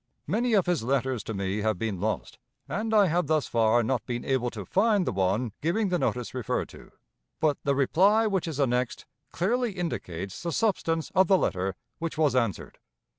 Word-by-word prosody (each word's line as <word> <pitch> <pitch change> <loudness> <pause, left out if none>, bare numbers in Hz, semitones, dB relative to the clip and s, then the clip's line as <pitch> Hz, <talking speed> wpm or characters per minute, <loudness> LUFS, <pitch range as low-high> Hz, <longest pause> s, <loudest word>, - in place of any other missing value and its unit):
Many 240 +2 0
of 195 - +3
his 175 -6 +1
letters 130 -1 0
to 110 - -4
me 95 +1 -2
have 110 -2 0
been 105 -2 -3
lost, 110 +1 -3 0.3
and 210 +10 -2
I 210 -2 +6
have 175 -2 +1
thus 155 -1 +2
far 115 +1 +3
not 125 0 -1
been 120 -1 -3
able 130 -3 +1
to 105 -5 -7
find 205 - +2
the - - 0
one 95 +5 0
giving 195 +6 +1
the 180 -1 +1
notice 125 -5 -2
referred 125 -5 -2
to, - - -14 0.5
but 150 -2 +1
the 140 -1 +2
reply 195 - +4
which 190 -5 0
is 155 -3 -4
annexed 125 -2 0 0.3
clearly 235 +5 0
indicates 95 - -4
the 170 - -3
substance 165 -6 0
of 190 -1 +4
the 190 - +5
letter 95 - -1 0.2
which 165 -1 -4
was 150 -4 +2
answered. 115 -8 -1
140 Hz, 190 wpm, -27 LUFS, 115-185 Hz, 0.5 s, I